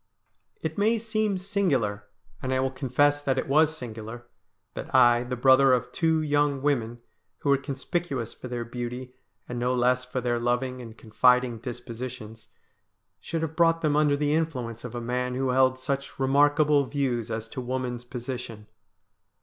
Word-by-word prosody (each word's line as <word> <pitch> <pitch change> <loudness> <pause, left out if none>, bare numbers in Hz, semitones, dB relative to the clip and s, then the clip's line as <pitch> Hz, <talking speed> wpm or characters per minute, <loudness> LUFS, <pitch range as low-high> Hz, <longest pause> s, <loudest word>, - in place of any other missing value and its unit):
It 160 +4 -3
may 220 +3 +3
seem 215 -3 -1
singular, 140 - 0 0.3
and 130 - -3
I 130 - +1
will 130 0 0
confess 145 +2 +1
that 135 -2 0
it - - -1
was 155 +3 +3
singular, 115 -1 -8 0.5
that - - -6
I, 120 -2 +6
the 125 +1 -4
brother 130 +1 +5
of 125 - 0
two 160 -1 +1
young 145 -2 +1
women, 120 -5 0 0.4
who 145 - -1
were 140 - +5
conspicuous 135 -2 -3
for - - -9
their 120 -1 -4
beauty, 125 +1 -6 0.3
and 120 -1 -4
no 125 +1 +1
less 125 +1 +2
for 125 0 -4
their 120 -1 0
loving 125 +2 -1
and 115 -2 -10
confiding 125 +1 +2
dispositions, 120 -2 -7 0.7
should 165 -1 -3
have 160 0 -4
brought 165 -1 +3
them 150 -2 +1
under 150 -1 +3
the 145 0 +1
influence 125 -8 -2
of 125 -1 -7
a 120 - -3
man 125 +1 -2
who 130 0 0
held 130 0 +3
such 140 +1 -4
remarkable 145 +2 +4
views 125 -6 -1
as 110 0 -4
to 130 - -5
woman's 125 -1 -3
position. 120 -3 -6
130 Hz, 165 wpm, -26 LUFS, 120-145 Hz, 0.7 s, I